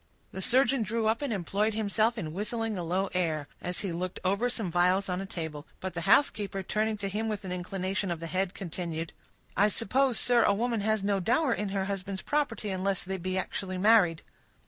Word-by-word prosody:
The 190 - -6
surgeon 255 +2 +3
drew 220 +2 -1
up, 220 +3 +2
and 285 -4 -2
employed 205 +2 0
himself 220 +2 +1
in 160 -7 -4
whistling 225 +3 -2
a 180 - -3
low 185 +3 -1
air, 160 -5 0
as 180 0 -2
he 195 - -2
looked 180 +2 -3
over 200 +6 +2
some 220 -7 -2
phials 180 +3 +3
on 180 +1 -1
a 195 - -5
table; 160 -5 -5
but 190 0 -4
the 175 +2 -3
housekeeper, 205 -6 +3
turning 215 +3 0
to 200 -1 -3
him 215 +3 -2
with 210 -2 -4
an 185 - -4
inclination 185 +2 -2
of 170 -2 -2
the 165 - -5
head, 185 +2 -1
continued,— 170 -2 -4 0.4
"I 205 +2 +4
suppose, 255 +4 +2
sir, 245 -1 +4
a 205 - +4
woman 230 0 0
has 215 -1 +1
no 200 -1 +1
dower 245 - +2
in 210 -2 -2
her 195 -1 -1
husband's 195 -1 -4
property, 245 -9 -1
unless 190 0 -1
they 190 +1 -3
be 185 +1 -2
actually 185 0 -3
married." 185 -5 +4
195 Hz, 210 wpm, -29 LUFS, 180-220 Hz, 0.4 s, I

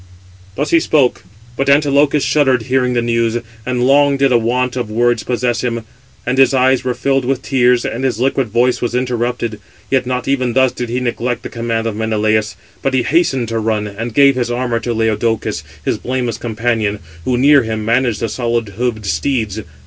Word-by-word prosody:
Thus - - -2
he 335 - +5
spoke; 145 - +1 0.3
but 135 +2 0
Antilochus 145 0 +3
shuddered, 135 -3 +2
hearing 125 0 +1
the 120 -1 0
news; 115 -1 0 0.3
and 125 -1 0
long 140 +1 +4
did 135 -1 +2
a 120 - +5
want 125 +2 0
of 120 -4 -3
words 120 +1 +1
possess 120 -1 -1
him; 115 -2 -2 0.4
and 125 +2 0
his 135 0 +5
eyes 130 0 +3
were 125 -1 -1
filled 135 -1 0
with 130 +1 -2
tears, 125 -2 +2
and 125 - -3
his 125 -4 -1
liquid 135 0 +1
voice 120 +3 +1
was 120 0 -2
interrupted. 120 -3 -2 0.3
Yet 130 -2 +1
not 125 0 -2
even 130 -3 0
thus 130 0 +3
did 120 -1 -5
he 125 +2 -1
neglect 120 0 -2
the - - -6
command 115 -1 -2
of 115 -2 -2
Menelaus; 110 0 0 0.3
but 135 -1 0
he 125 - +2
hastened 135 -2 +1
to 115 0 -1
run, 110 -1 -1
and 110 +3 -5
gave 140 +4 +5
his 120 -1 -1
armour 120 -1 -1
to 120 +1 -3
Laodocus, 115 0 -1 0.2
his - - -1
blameless 125 -3 -3
companion, 110 -2 -1 0.3
who, 125 +5 0
near 140 +2 +5
him, 110 -2 -4
managed 120 -1 +1
the 115 - 0
solid 115 -3 -2
hoofed 110 0 -3
steeds. 110 -1 -1
120 Hz, 195 wpm, -16 LUFS, 115-130 Hz, 0.4 s, he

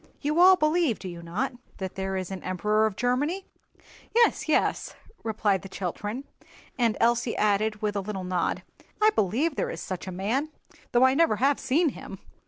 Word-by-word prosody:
You 300 +3 0
all 375 +1 +8
believe, 310 - +2
do 190 - -8
you 175 -1 -7
not, 190 +12 -2 0.2
that 190 -1 -5
there 190 0 -3
is 185 0 -4
an 190 - -5
Emperor 210 +4 +1
of 210 - -5
Germany?" 275 - 0 0.7
"Yes, 470 -8 +3
yes," - - +1 0.3
replied 210 -4 0
the 195 - -10
children: 205 +7 -4 0.5
and 230 -5 +1
Elsie 235 0 +2
added 210 +1 +1
with 210 -1 0
a 200 - 0
little 195 -1 -5
nod, 180 -2 -1 0.4
"I 430 0 +5
believe 275 - 0
there - - 0
is - - -5
such 185 0 -6
a - - -4
man, 220 +12 -1 0.4
though 240 +1 +4
I 260 - +4
never 325 -5 +3
have 270 +6 +2
seen 315 +5 +2
him." - - -9
220 Hz, 185 wpm, -27 LUFS, 190-285 Hz, 0.7 s, all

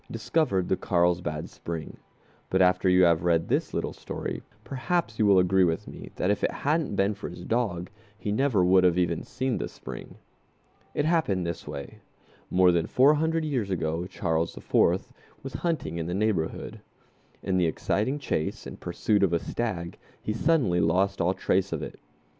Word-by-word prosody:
discovered 110 - 0
the - - +2
Carlsbad 85 -4 0
Spring, 80 -2 -6 0.5
but 95 - +2
after 90 0 +4
you 90 0 +5
have 85 -2 +4
read 85 -2 +2
this - - +1
little - - -2
history - - -5 0.2
perhaps 135 -3 -2
you 105 - +4
will 100 -1 +6
agree 95 +1 +4
with 80 -2 0
me - - -9
that 95 - +1
if 105 - -1
it - - +3
hadn't 155 -5 -1
been 100 +2 +2
for - - -7
his 90 0 -9
dog 105 -7 -1 0.3
he 105 -2 -3
never 110 -5 +2
would 95 +1 +5
have 90 -1 +4
even 85 -2 +1
seen 130 -2 -2
the - - -2
spring. - - -9 0.8
It 150 - +1
happened 155 - +1
this 85 -1 -5
way: 70 - -7 0.5
More 90 0 +5
than 85 -2 +1
four 135 +4 +5
hundred 160 +1 0
years 125 -9 -1
ago 85 -1 -1
Charles 80 -3 -1
IV. - - +2 0.4
was 135 -2 -6
hunting 155 - -2
in 80 - -3
the 90 - -2
neighborhood. 100 -6 -1 0.6
In 95 -1 0
the 90 -2 +3
exciting 105 - 0
chase 125 - -2
and - - -8
pursuit 105 -2 0
of 95 -3 +3
a 85 - +3
stag 90 -8 -4 0.2
he 105 - -3
suddenly 120 - +2
lost 95 +4 +2
all 90 +3 +2
trace 95 +1 +1
of - - -3
it. - - -8
95 Hz, 180 wpm, -27 LUFS, 85-115 Hz, 0.8 s, will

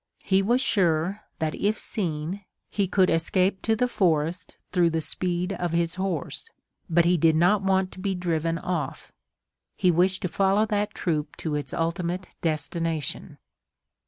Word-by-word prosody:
He 195 0 +3
was 240 +6 +2
sure 185 -2 +1 0.2
that 155 -1 -1
if 210 +2 0
seen 175 -1 -3 0.3
he 200 -2 0
could 185 0 +3
escape 185 +4 +1
to 225 - +2
the 250 +3 +1
forest 175 -5 0 0.2
through 175 -3 +3
the 165 0 0
speed 180 +3 -1
of 175 -2 -2
his 170 -1 +1
horse. 190 - -3 0.4
But 170 0 +4
he 175 +1 +4
did 160 0 +4
not 180 +5 +4
want 190 -1 +1
to - - -11
be 195 0 -1
driven 165 -2 -1
off. 165 -6 -4 0.6
He 180 - +3
wished 185 +3 +2
to - - +1
follow 195 +4 +2
that 210 0 -1
troop 155 -3 -2
to 160 - -4
its 145 -1 -3
ultimate 170 +2 -2
destination. 160 -1 -2
180 Hz, 160 wpm, -26 LUFS, 165-195 Hz, 0.6 s, But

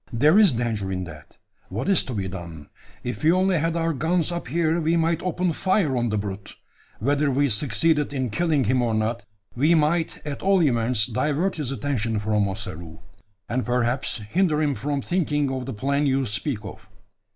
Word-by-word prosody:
"There 150 - +4
is 200 -9 +6
danger 110 -5 -2
in 95 -1 -2
that. 75 -4 -11 0.3
What 110 +7 -3
is 195 -2 +4
to 125 - -5
be 95 -2 -2
done? 85 -5 -8 0.3
If 125 +5 -5
we 160 - +5
only 185 -1 +2
had 165 +2 0
our 165 -1 0
guns 165 +4 +1
up 175 -5 -4
here, 165 +4 +1
we 165 +2 +2
might 165 0 +1
open 180 -1 -1
fire 185 -5 +1
on 120 -1 0
the 105 - 0
brute. 100 -1 -5 0.4
Whether 145 +5 +1
we 140 +1 +2
succeeded 145 +6 +1
in 130 -4 -2
killing 155 +2 +1
him 125 +3 +2
or 115 -2 0
not, 110 0 -1 0.3
we 150 +7 +4
might 160 +2 +1
at 145 -2 -5
all 190 -2 +3
events 120 -5 +2
divert 150 - -1
his 145 -5 -3
attention 120 -6 -1
from 105 -1 +1
Ossaroo, 85 -5 -6 0.5
and 125 +2 -1
perhaps 125 +1 0
hinder 165 - +1
him 150 -2 +1
from 140 0 -3
thinking 150 -6 0
of 130 -1 -4
the - - -3
plan 140 +6 0
you 135 0 +1
speak 105 +1 -3
of. 95 0 -10
135 Hz, 190 wpm, -24 LUFS, 110-160 Hz, 0.5 s, is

